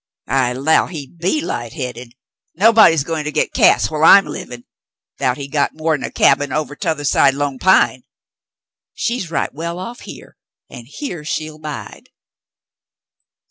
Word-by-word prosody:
"I 130 -2 0
'low 140 +5 +2
he 155 -6 -7
be 175 - -2
light 120 - -5
headed. 125 -4 -7 0.4
Nobody's 200 -6 +5
goin' 160 0 -3
to 150 - -3
git - - -1
Cass - - +3
whilst 155 +1 +2
I'm 200 0 +8
livin', 120 -1 -8 0.6
'thout 125 -1 0
he's 140 -1 -8
got.more'n 155 0 -1
a - - -3
cabin 145 -1 +2
ovah 150 0 -3
t'othah 160 -4 -3
side 135 0 +3
Lone 140 -2 -3
Pine. 190 +6 +3 0.9
She's 235 -8 -2
right 165 - -2
well 170 +4 -5
off 235 +7 -7
here, - - -12 0.3
an' 120 - -10
here 175 - -7
she'll 155 0 -5
'bide." 150 -1 -8
155 Hz, 145 wpm, -18 LUFS, 135-170 Hz, 0.9 s, I'm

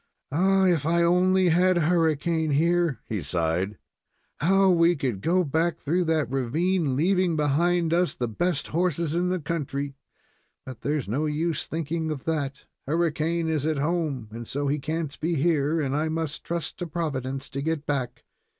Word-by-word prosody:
Ah, 190 +5 +3
if 170 -5 +2
I 170 +2 +2
only 180 +1 +3
had 180 +2 +3
Hurricane 160 -1 +1
here," 165 -1 +2
he 105 -4 -3
sighed. 85 +6 -1 0.6
"How 195 +5 +4
we 170 0 +4
would 120 -9 -2
go 180 - +2
back 160 +2 0
through 170 +4 0
that 160 -2 +1
ravine, 150 +4 0
leaving 180 +3 +2
behind 165 +3 +2
us 175 +1 +1
the 120 - -2
best 170 +7 -1
horses 170 -2 0
in 175 +1 +1
the 185 0 0
country; 145 -3 -3 0.7
but 130 -2 -9
there's 145 -4 -1
no 140 +9 -1
use 155 +1 -1
of - - -23
thinking 160 0 -2
of 150 -4 -4
that. 140 -4 -3 0.2
Hurricane 165 +1 0
is 155 -2 0
at 155 -2 0
home, 150 -5 -1
and 115 +1 -7
so 145 +1 -2
he 145 +2 0
can't 155 0 -4
be 165 +2 0
here, 155 0 +1
and 140 -2 -1
I 155 +2 0
must 160 -1 -3
trust 165 -2 -4
to 175 - -3
Providence 135 -5 -3
to 140 - -3
get 155 0 -2
back. 135 -4 -3
160 Hz, 170 wpm, -26 LUFS, 140-170 Hz, 0.7 s, How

